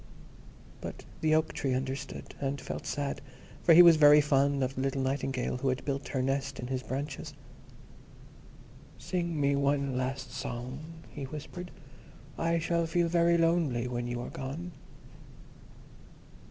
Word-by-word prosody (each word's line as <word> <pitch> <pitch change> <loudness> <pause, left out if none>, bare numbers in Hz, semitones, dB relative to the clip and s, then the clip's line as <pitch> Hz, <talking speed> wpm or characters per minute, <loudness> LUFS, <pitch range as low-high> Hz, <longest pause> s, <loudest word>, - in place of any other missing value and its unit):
But - - -7 0.2
the 155 0 +3
Oak 155 0 +1
tree 130 -2 -1
understood, 130 +1 -4
and 140 0 -1
felt - - -6
sad, 140 -1 -2 0.4
for 165 - +6
he 175 - +11
was 170 -2 +8
very 150 0 +8
fond 140 -1 +2
of 130 +1 -1
the 130 - -3
little 135 0 0
Nightingale 130 -2 -1
who 130 +1 0
had 130 0 -2
built 140 0 -2
her 130 -2 -1
nest 135 0 -1
in 125 - -4
his 130 0 -2
branches. 135 +2 -5 1.6
"Sing 170 -3 -2
me 140 0 +3
one 140 -1 +1
last 130 +1 -3
song," 125 0 -5 0.3
he 140 - -5
whispered; 155 +5 -7 0.7
"I 165 0 +1
shall 165 0 0
feel 170 +1 +1
very 170 0 +4
lonely 165 -8 +2
when 120 -1 -3
you 120 0 -3
are - - -6
gone." 155 +7 -5
140 Hz, 150 wpm, -30 LUFS, 130-160 Hz, 1.6 s, he